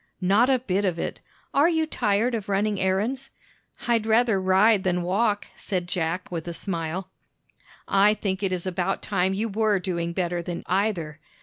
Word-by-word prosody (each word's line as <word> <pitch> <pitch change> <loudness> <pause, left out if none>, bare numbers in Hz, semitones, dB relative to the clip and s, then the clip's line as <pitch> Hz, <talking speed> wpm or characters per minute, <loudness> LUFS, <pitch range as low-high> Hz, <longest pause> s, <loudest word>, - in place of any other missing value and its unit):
"Not 200 +7 +3
a 265 - +4
bit 205 -5 -1
of 180 -4 0
it. - - -4 0.3
Are 290 +4 +4
you 320 -2 +1
tired 230 -4 0
of 215 -3 -3
running 200 0 0
errands?" 220 +9 -1 0.6
"I'd 230 -2 +2
rather 225 -3 +3
ride 190 +2 +4
than 180 -1 0
walk," 205 +3 +1
said 180 -3 -3
Jack 175 0 -2
with 170 -1 -4
a 170 - -3
smile. 170 0 -4 0.8
"I 205 +2 +4
think 195 -2 -2
it 195 -2 0
is 180 -1 -2
about 185 +1 -2
time 190 +2 0
you 215 +3 -1
were 215 -1 +1
doing 170 -2 -2
better 175 -1 -1
than 175 0 -5
either. 180 -6 -1
195 Hz, 175 wpm, -25 LUFS, 180-215 Hz, 0.8 s, a